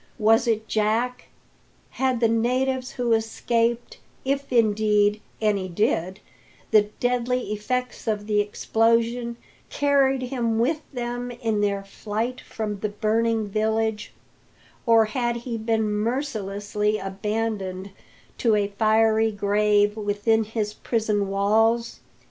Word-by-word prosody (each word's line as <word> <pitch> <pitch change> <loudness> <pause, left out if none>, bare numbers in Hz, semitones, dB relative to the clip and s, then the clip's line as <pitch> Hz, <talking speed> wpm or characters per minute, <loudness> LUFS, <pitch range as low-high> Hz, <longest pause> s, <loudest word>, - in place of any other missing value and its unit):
Was 225 +1 +3
it 220 -1 0
Jack? 225 +4 0 0.6
Had 260 -2 0
the 230 - +5
natives 255 +3 0
who 245 -2 0
escaped 230 +1 0 0.3
if, 275 +1 -1
indeed, 210 -2 +3 0.2
any 205 -4 0
did 185 0 -1 0.5
the 210 -2 +5
deadly 250 -1 0
effects 250 +4 -3
of 210 -2 -1
the 210 -1 +1
explosion, 230 +3 +1 0.3
carried 275 -2 +2
him 240 -3 -1
with 290 +7 +1
them 245 -1 -4
in 230 -4 -2
their 200 -1 0
flight 220 +5 -4
from 210 -2 -5
the 210 - -2
burning 220 +1 0
village, 220 +1 -1 0.8
or 225 -1 +6
had 240 +1 -1
he 235 0 -5
been 225 0 0
mercilessly 210 -3 -1
abandoned 195 -1 -3 0.5
to 225 -3 +3
a 205 -1 +1
fiery 220 0 +3
grave 205 0 +2
within 215 +1 +1
his 210 -1 -3
prison 215 -4 -1
walls? 220 +4 +1
220 Hz, 115 wpm, -24 LUFS, 210-240 Hz, 0.8 s, or